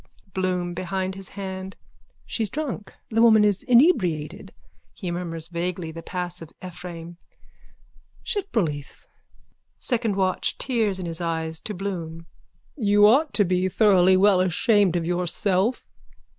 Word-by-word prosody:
BLOOM: 180 -2 -1
(Behind 185 +1 -3
his 195 0 -5
hand.) 190 -1 -6 0.5
She's 220 -3 -2
drunk. 265 -6 -5 0.2
The 225 +1 +2
woman 220 -2 +6
is 205 -2 +1
inebriated. 230 - +2 0.4
(He 180 -4 -5
murmurs 165 -2 -4
vaguely 175 -1 -3
the 165 +1 -8
pass 180 0 -5
of 165 - -9 0.2
Ephraim.) 175 -1 -8 1.1
Shitbroleeth. 215 - -3 0.7
SECOND 230 -5 -1
WATCH: 190 -1 0
(Tears 225 -7 +1
in 185 - -4
his 165 0 -2
eyes, 160 -1 -1
to 210 - -5
Bloom.) 170 -4 -5 0.5
You 205 -6 +4
ought 275 +8 +4
to 205 - +4
be 185 +1 +1
thoroughly 185 -3 +4
well 195 -1 +5
ashamed 185 +1 +3
of 170 -2 -1
yourself. 180 +5 0
185 Hz, 130 wpm, -24 LUFS, 175-210 Hz, 1.1 s, woman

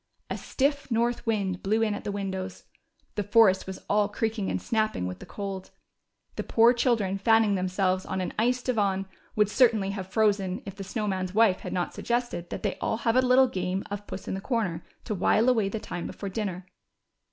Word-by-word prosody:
A - - -1
stiff 280 +1 -1
north 235 +1 0
wind 195 -5 0
blew 220 +3 +1
in 215 -2 +1
at 205 - -6
the - - -1
windows. 190 -2 -4 0.5
The 210 - -1
forest 205 -3 +4
Avas 190 0 -7
all 205 0 +2
creaking 215 -1 -1
and - - -1
snapping 215 - 0
Avith 90 0 -5
the - - -11
cold. 195 -2 -5 0.7
The - - -1
poor 230 +2 +5
children, 225 -6 +1
fanning 225 0 +4
themselves, 185 0 0
on 190 - -3
an 185 - -3
ice 245 +2 +2
divan, 200 -6 0 0.3
Avould 210 -1 +4
certainly 220 -5 +3
have 195 -2 -5
frozen 200 -2 +1
if 195 - -7
the 200 - -6
SnoAv 210 +2 -3
Man's 185 -1 -2
Avife 215 -3 +4
had - - -6
not 175 -1 -1
suggested 240 -8 -2
that - - -6
they 205 - -2
all 220 - 0
have 230 0 +1
a 255 - +6
little 255 +1 +5
game 185 -3 -2
of 205 0 -5
j)uss 190 - -7
in - - -2
the 190 - -3
corner 200 -9 -1
" - - -40
to 215 - -2
Avhile 220 +6 +4
aAvay 210 -4 0
the 220 - -3
time 175 - -5
before 200 - -6
dinner. 190 -3 -4
205 Hz, 210 wpm, -27 LUFS, 190-225 Hz, 0.7 s, a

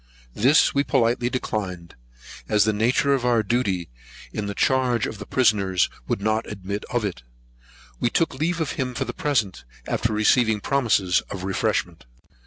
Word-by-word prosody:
This 130 - +4
we 140 - +2
politely 120 -2 +1
declined, 95 -9 -4 0.6
as 105 -1 +4
the 110 0 +1
nature 120 +6 +2
of 135 -3 0
our 120 -3 +2
duty 100 - -1 0.4
in 105 -1 -3
the 100 - -4
charge 125 -3 +2
of 105 - -6
the - - -8
prisoners 100 -7 +2 0.2
would - - -1
not 110 +1 0
admit 100 0 -5
of 120 -3 -1
it. 90 -11 -4 0.8
We - - +1
took 165 +6 +1
leave 165 +5 -1
of 160 -3 -1
him 125 -1 -3
for - - -2
the - - -5
present, 115 - -1 0.2
after 115 - -1
receiving 110 +1 +3
promises 110 -8 +2
of 95 -2 -6
refreshment. 95 0 -1
110 Hz, 165 wpm, -23 LUFS, 100-125 Hz, 0.8 s, This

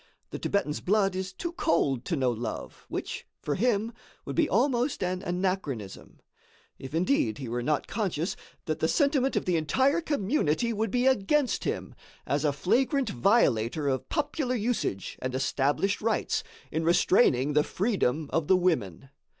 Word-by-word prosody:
The - - -5
Thibetan's 200 -7 -1
blood 195 -1 +2
is 190 0 -3
too 340 - -5
cold 140 - 0
to 170 - -1
know 130 -4 +1
love, 115 -1 -6
which, - - -5
for 145 - -2
him, 225 - +1 0.3
would - - -5
be - - +2
almost 255 -3 +1
an 180 0 -1
anachronism; 175 - -3 0.6
if 135 +3 -7
indeed 165 - +1
he 135 - -6
were 120 +1 -2
not 150 +4 0
conscious 185 -5 -2 0.3
that - - -2
the - - +2
sentiment 280 -3 +2
of - - 0
the 180 -2 +2
entire 265 - +2
community 235 - 0
would 220 +1 -1
be 245 +4 +1
against 265 +2 +2
him, - - -3 0.3
as 140 +1 0
a 150 - +3
flagrant 255 - +1
violator 135 - +2
of 130 -1 -2
popular 290 -4 -1
usage 220 - -2
and 130 0 -3
established 145 +8 0
rights, 220 0 0 0.3
in 160 +1 -1
restraining 155 - +3
the 150 0 +4
freedom 160 - 0
of 165 -2 +1
the 190 - +5
women. 135 - -1
185 Hz, 160 wpm, -28 LUFS, 140-240 Hz, 0.6 s, the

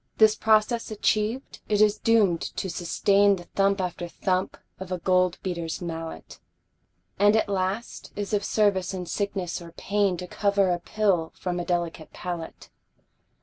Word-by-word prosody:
This 220 -1 +6
process 220 +2 +2
achiev'd, 215 +3 -1
it 210 -1 +2
is 210 0 +4
doom'd 210 -7 +3 0.2
to 190 - -2
sustain 195 +4 +3
The 175 - -9
thump 195 +2 +1
after 175 -1 -3
thump 185 +2 -1 0.2
of 185 -1 -7
a 185 - 0
gold 180 0 +2
beater's 170 -3 -3
mallet, 165 -2 -7 0.8
And 205 +1 +5
at 220 - +2
last 195 +3 -3
is 205 +1 -4
of 205 - +1
service 195 -3 +1
in 180 -1 -4
sickness 190 -2 -3
or 170 -1 -11
pain 200 -1 0
To 180 - -6
cover 200 0 +1
a 175 - 0
pill 185 -4 0
from 180 -1 -3
a 175 - -3
delicate 170 -2 -2
palate. 175 -2 -6
190 Hz, 155 wpm, -26 LUFS, 175-205 Hz, 0.8 s, This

